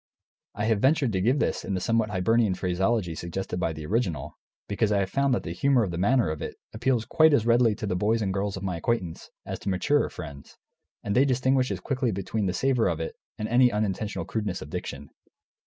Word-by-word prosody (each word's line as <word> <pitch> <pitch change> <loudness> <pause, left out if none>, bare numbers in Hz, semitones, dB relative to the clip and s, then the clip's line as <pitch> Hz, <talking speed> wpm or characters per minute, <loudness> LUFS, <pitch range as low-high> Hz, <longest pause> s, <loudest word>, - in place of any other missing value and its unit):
I 105 - -1
have 110 -2 +2
ventured 135 0 +3
to 95 -2 0
give 125 +8 +3
this - - 0
in 100 - -2
the - - -1
somewhat 115 +3 +1
Hibernian 105 +1 +2
phraseology 95 +1 0
suggested 90 +2 -4
by 85 - 0
the 75 -1 -7
original, 85 - -1 0.3
because 105 +1 0
I 105 - +3
have 95 -1 -3
found 140 0 +2
that - - -3
the 80 - -5
humour 125 +7 +2
of 95 - -2
the 85 - -4
manner 110 -3 +3
of 80 - -5
it - - -5 0.2
appeals 120 0 0
quite 160 -2 +4
as 115 - +1
readily 115 -2 +4
to 105 - -5
the 95 -3 -1
boys 110 +4 +1
and 95 -2 -1
girls 100 0 -2
of 95 - -7
my 90 -3 -2
acquaintance 90 -3 -2 0.2
as - - -5
to - - -4
maturer 145 +11 +2
friends, 70 -1 -10 0.5
and 100 - -2
they 130 - +6
distinguish 130 0 +2
as - - -3
quickly 130 -3 -1
between 100 +2 -2
the 90 - -1
savour 125 +2 +2
of 85 -3 -1
it 80 - -4 0.2
and 105 - -3
any 125 +1 +4
unintentional 105 0 -2
crudeness 105 -5 -3
of - - -12
diction. 70 0 -6
105 Hz, 225 wpm, -26 LUFS, 90-120 Hz, 0.5 s, they